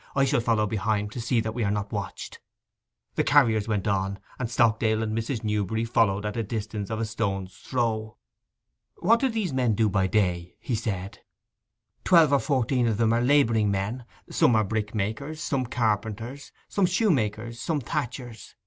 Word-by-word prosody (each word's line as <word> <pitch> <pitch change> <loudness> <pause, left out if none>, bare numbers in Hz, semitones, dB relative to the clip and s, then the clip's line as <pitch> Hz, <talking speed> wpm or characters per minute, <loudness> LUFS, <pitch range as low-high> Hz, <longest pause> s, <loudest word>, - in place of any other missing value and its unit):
'I 135 0 +4
shall 130 - +2
follow 115 -2 +2
behind, 105 0 -1
to 120 - -5
see 120 0 +1
that 110 0 -3
we 120 0 -2
are 100 - +1
not 105 0 -2
watched.' - - -5 0.7
The - - +1
carriers 115 -7 +4
went 105 -2 -1
on, 100 -1 0 0.2
and 120 -3 -2
Stockdale 110 -2 +2
and 110 0 -2
Mrs. 115 +1 -2
Newberry 105 +1 -1
followed 105 -3 +2
at 105 - -3
a 115 - 0
distance 105 -2 -4
of 110 - -3
a 115 - 0
stone's 95 -4 -3
throw. 110 -3 -2 0.8
'What 230 +6 +3
do 265 - +1
these 215 - -2
men 125 -4 +2
do 110 0 +2
by 95 -1 +1
day?' 90 -4 0
he 125 - -4
said. 100 -4 -3 0.8
'Twelve 165 -6 +5
or 140 - +5
fourteen 130 -3 +1
of 110 -3 0
them 115 0 +3
are 120 - +2
labouring 120 -5 +3
men. 100 +5 -2 0.2
Some 120 - +3
are 110 - +4
brickmakers, 110 +8 -3
some 135 -6 -1
carpenters, 115 +3 -2 0.2
some 195 -3 +1
shoe 195 +4 +2
makers, 115 -3 -1
some 160 -3 0
thatchers. 125 -3 -5
110 Hz, 175 wpm, -26 LUFS, 105-125 Hz, 0.8 s, Twelve